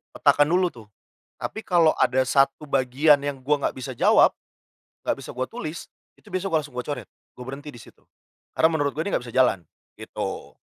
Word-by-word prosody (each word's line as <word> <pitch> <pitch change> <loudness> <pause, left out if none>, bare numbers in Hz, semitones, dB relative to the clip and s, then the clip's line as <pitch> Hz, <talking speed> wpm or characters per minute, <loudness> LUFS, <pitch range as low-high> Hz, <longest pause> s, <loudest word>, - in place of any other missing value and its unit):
petakan 145 0 +4
dulu 180 0 +3 0.2
tuh. - - -23 0.5
Tapi 220 - -5
kalo 170 -3 +4
ada 130 0 +3
satu 135 +3 +2
bagian 140 +2 +3
yang 145 -1 -3
gua 145 0 +1
nggak - - -1
bisa 130 0 -5
jawab, - - +5 0.7
gak - - 0
bisa - - -9
gua 130 - 0
tulis, 165 -9 -7 0.3
itu - - -20
biasanya 185 +1 -2
gua 160 - +4
langsung 145 -4 -13
gua 125 - -2
coret, 125 -8 -5 0.3
gua 125 - -10
berhenti 145 +2 -7
di 120 - -12
situ. - - -19 0.5
Karena 160 - +4
menurut 145 -3 0
gua 160 - -2
ini 200 - -2
gak 125 - -1
bisa 120 - -10
jalan, 125 -9 +2 0.3
gitu. - - -6
145 Hz, 195 wpm, -24 LUFS, 130-160 Hz, 0.7 s, jawab